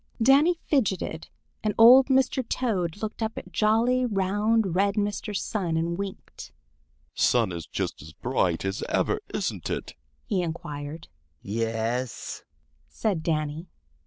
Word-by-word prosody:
Danny 280 +9 +5
fidgeted, 190 - 0 0.4
and 210 -1 0
old 250 +4 +9
Mr. 265 -1 +2
Toad 200 -6 -1
looked 215 +1 -4
up 220 0 -2
at - - -8
jolly, 230 +4 +2
round, 205 -1 +1
red 200 +1 +2
Mr. 205 0 -1
Sun 180 -7 -2
and 170 +1 -1
winked. 195 +1 -7 0.6
"Sun 115 -6 +2
is 85 -2 -6
just - - -3
as 75 +1 -11
bright 95 -5 -1
as 95 0 -2
ever, - - +1
isn't - - -3
it?" - - -4 0.3
he 195 -4 0
inquired. 155 -2 -6 0.4
"Yes," 115 +2 -2 0.5
said 165 - -1
Danny. 155 +1 -2
190 Hz, 130 wpm, -26 LUFS, 145-220 Hz, 0.6 s, old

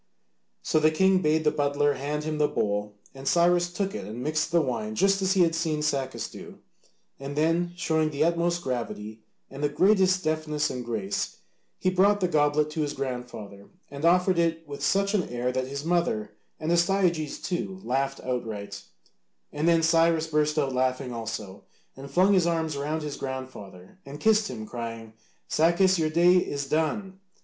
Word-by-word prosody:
So 155 - +2
the 155 0 +4
king 190 +4 +3
bade 155 -1 +2
the 150 - +3
butler 145 -1 +1
hand 145 +3 -3
him 155 0 -3
the 150 - +4
bowl, 105 -7 -2 0.2
and 135 0 -9
Cyrus 175 +2 +3
took 195 +2 -2
it - - -5
and 110 +5 -6
mixed 155 +1 -1
the 170 - +4
wine 115 -7 -2
just 195 - +2
as 190 0 +2
he 190 - +3
had 165 -1 +2
seen 160 -2 -1
Sacas 135 -3 -2
do, - - -11 0.6
and 140 +1 -6
then, 165 +3 +1
showing 160 -2 +1
the 145 0 0
utmost 170 +1 +1
gravity 115 -4 -4 0.3
and 135 +2 -7
the 145 - +2
greatest 185 +3 +3
deftness 155 -1 -1
and 125 - -5
grace, 110 -4 -3 0.4
he 185 - 0
brought 200 +3 +3
the 185 - +1
goblet 150 -1 +2
to 155 - -2
his 145 -1 -1
grandfather 125 -7 -6 0.2
and 140 +1 -8
offered 180 +1 +3
it 165 -1 0
with 140 -1 -7
such 195 +6 +2
an 200 -4 0
air 120 +1 -1
that 130 0 -2
his 140 +2 -5
mother 165 -12 0 0.3
and 160 +1 -2
Astyages, 175 -3 +1
too, 185 +1 -4
laughed 135 +2 -1
outright, 105 -5 -4 0.7
and 150 +3 -1
then 165 -1 +4
Cyrus 165 0 +3
burst 150 -1 0
out 140 -3 +1
laughing 130 0 -1
also, 110 -4 -6 0.3
and 135 +1 -10
flung 185 +7 +4
his 180 -3 +3
arms 160 -3 -1
round 150 +3 -2
his 150 -1 -5
grandfather 130 - -8
and 140 +2 -9
kissed 215 +3 +3
him, 110 -4 -6
crying, 115 -1 -7 0.3
"Sacas, 175 +3 +3
your 155 -1 +1
day 175 +3 +5
is 140 -5 -1
done! 190 +6 -1
150 Hz, 180 wpm, -26 LUFS, 130-170 Hz, 0.7 s, day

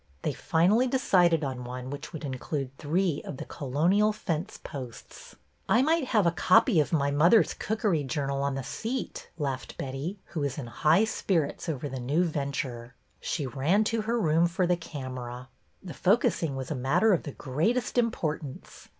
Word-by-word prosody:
They - - 0
finally 205 +10 +3
decided 180 - +3
on 130 -3 -3
one 125 +1 -6
which 145 0 -7
would 160 -3 -6
include 135 0 -4
three 165 +1 0
of 140 - -7
the - - -6
colonial 170 +10 +1
fence 185 -3 -3
posts. 130 -6 -9 0.3
I 240 +3 +5
might 320 0 +2
have 215 -6 +2
a 170 - +4
copy 180 - +4
of 150 - +1
My 140 -4 +2
Mother's 165 +6 +5
Cook 220 +1 -3
ery 165 -8 +2
Journal 140 0 -2
on 140 -1 0
the 135 - -3
seat," 235 - -4
laughed 135 -4 -4
Betty, 140 +9 -4
who 160 - -4
was 140 -2 -2
in 140 - -4
high 155 - +3
spirits 180 -7 -1
over 145 -2 -3
the 130 -1 -5
new 145 +8 +1
venture. 140 -6 -3 0.2
She 150 - -2
ran 145 - +2
to 225 +1 0
her 230 +2 0
room 165 -2 +3
for 180 +2 0
the 180 0 +3
camera. 130 -6 -7 0.3
The 180 -4 -7
focussing 175 - +2
was 135 +2 -5
a - - +2
matter 135 - +3
of 175 - +1
the 145 - -7
greatest 175 - -1
importance. 160 - -2
155 Hz, 175 wpm, -28 LUFS, 135-190 Hz, 0.3 s, I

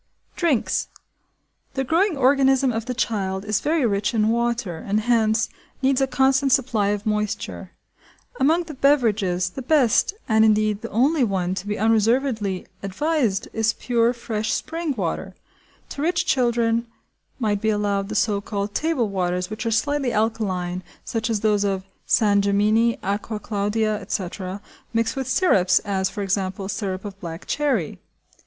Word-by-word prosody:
Drinks. 315 -10 +1 0.9
The 270 - 0
growing 335 +5 +1
organism 270 0 +4
of 225 +1 -4
the 250 - -3
child 195 -5 -1
is 210 -1 +1
very 305 -2 +1
rich 210 0 0
in 215 0 +3
water, 235 -7 -1
and, 205 +5 -1
hence, 220 -1 +2 0.4
needs 270 0 +3
a 270 - +3
constant 265 +1 +2
supply 245 -6 +2
of 205 +1 -1
moisture. 210 -1 -3 0.7
Among 325 +6 +3
the 320 -2 -9
beverages, 215 -11 +2
the 265 - -6
best, 270 - +3
and 220 -1 +4
indeed 215 -1 +2
the 230 - -6
only 270 +6 +2
one, 185 -5 0
to 195 +1 -5
be 210 0 -2
unreservedly 220 -2 +1 0.2
advised 225 - 0
is 225 -1 +1
pure 235 -1 +1
fresh 220 -3 -3
spring 330 -3 -3
water. 190 0 -3 0.5
To 280 - -6
rich 335 +2 +1
children 235 -2 +1 0.5
might 210 -5 0
be 220 - +1
allowed 205 -2 0
the - - -4
so 210 -2 +1
called 200 0 -4
table 310 -6 0
waters 180 -1 -2
which 220 +2 -4
are - - 0
slightly 285 +2 0
alkaline, 195 -5 -1 0.2
such 225 0 -2
as 215 -3 0
those 210 -2 +2
of 195 -2 -1 0.2
San 205 -2 +3
Gemini, 215 +3 +2
Acqua 210 +2 -2
Claudia, 210 +1 -1
etc., 190 0 -4 0.3
mixed 230 0 +1
with 265 -2 -3
syrups, 190 - +3
as, 190 -2 0
for 205 - -5
example, 190 0 -2
syrup 190 -1 -3
of 195 -1 -8
black 165 -1 -7
cherry. 265 - -1
220 Hz, 155 wpm, -23 LUFS, 200-255 Hz, 0.9 s, organism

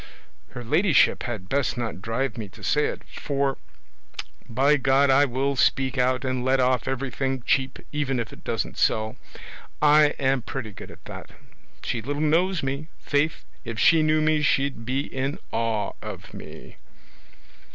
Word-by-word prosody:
Her 125 - -6
ladyship 155 - +3
had 105 -6 -5
best 130 -1 0
not 115 -6 -4
drive 120 +6 -2
me 110 -4 -6
to - - -14
say 150 0 +2
it, - - -5
for 140 -2 -2 0.9
by 135 +6 +3
God 135 +1 +3
I 140 +2 +6
will 135 +2 -1
speak 130 0 +2
out 130 0 +1
and 130 -1 -1
let 130 +1 +2
off 125 -2 +2
everything 135 0 -2
cheap, 135 -1 +1
even 145 -3 -1
if 115 -2 -4
it - - -14
doesn't - - -3
sell: 110 0 +1 0.6
I 150 0 +5
am 135 -1 +1
pretty 115 -2 -5
good - - -10
at - - -15
that! - - -9 0.5
she 115 - -2
little 145 +4 -3
knows 165 +3 +2
me; 140 +3 -3
faith, 145 +2 0 0.2
if 115 -2 -6
she 165 +5 +5
knew 155 0 +3
me 155 0 +2
she'd 135 -4 +1
be 130 +2 0
in 135 +2 -3
awe 115 -3 -1
of - - -8
me." - - -11
135 Hz, 160 wpm, -25 LUFS, 125-145 Hz, 0.9 s, I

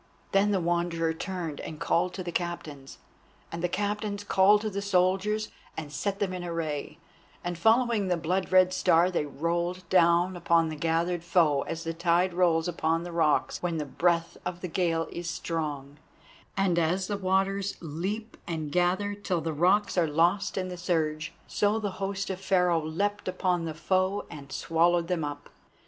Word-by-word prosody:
Then 195 +1 +3
the 200 -2 +2
Wanderer 170 -1 0
turned 170 -3 -4
and 155 - -7
called 175 +2 +1
to 185 - -4
the 175 - -4
Captains, 155 -6 -5 0.5
and 170 - -5
the 175 - +1
Captains 205 +1 -2
called 205 +1 +4
to 215 - -2
the 200 +1 -3
soldiers 200 +3 +1 0.3
and 155 -2 -5
set 200 +6 -2
them 200 -2 -1
in 180 -1 -5
array, 165 -4 -3 0.5
and 175 0 -2
following 225 +2 +3
the 180 -1 +1
blood 180 +4 -1
red 185 0 +5
Star 180 -1 +3
they 150 -4 -1
rolled 170 +5 -2
down 175 0 +4
upon 170 -2 +2
the 155 - -5
gathered 165 +2 0
foe 165 -5 +3
as 165 - -4
the 165 -1 -3
tide 175 +2 +2
rolls 170 -2 +2
upon 165 -1 0
the 175 - -6
rocks 160 -3 +1
when 170 -2 -1
the 150 - -2
breath 170 +3 0
of 180 0 -5
the 180 - -3
gale 165 -2 0
is 175 0 -5
strong; 150 -4 -4 0.6
and 185 -3 +2
as 175 +4 +1
the 205 - -2
waters 195 +1 0
leap 190 +8 -4
and 160 -3 -3
gather 185 +4 +1
till 200 -4 -2
the 160 0 -2
rocks 185 +5 +2
are 165 - +3
lost 170 +8 +1
in 185 -1 -1
the 180 - -6
surge, 155 -3 -1
so 210 +1 +1
the 210 -3 -2
host 195 0 -2
of 190 0 -6
Pharaoh 180 -4 +2
leapt 200 +7 -2
upon 180 -2 0
the 160 -1 -4
foe 185 +5 0
and 140 -2 -10
swallowed 170 +2 +2
them 175 -3 0
up. 145 0 -6
175 Hz, 180 wpm, -28 LUFS, 165-190 Hz, 0.6 s, red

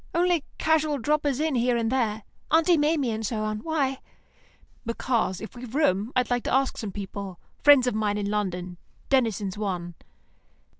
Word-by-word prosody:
Only 345 -3 +2
casual 310 -2 +2
droppers 290 +1 0
in 310 -1 0
here 245 -1 +2
and 230 0 0
there; 220 -5 0 0.3
Aunt 320 +2 +4
Maimie 295 -4 +2
and 220 0 -3
so 215 0 -2
on. 215 0 -2
Why?" 275 -1 -1 0.8
"Because, 230 -4 -1
if 220 - -9
we've 245 0 -8
room, 220 -7 +2
I 250 - +4
want 245 -1 -1
to - - -1
ask 270 0 +1
some 210 -3 -4
people; 195 -1 -6 0.2
friends 285 -3 +7
of 250 - 0
mine 210 -1 0
in 205 -1 -2
London. 180 -4 -3 0.3
Denison's 215 -7 +1
one." 180 -4 -3
235 Hz, 165 wpm, -26 LUFS, 210-285 Hz, 0.8 s, friends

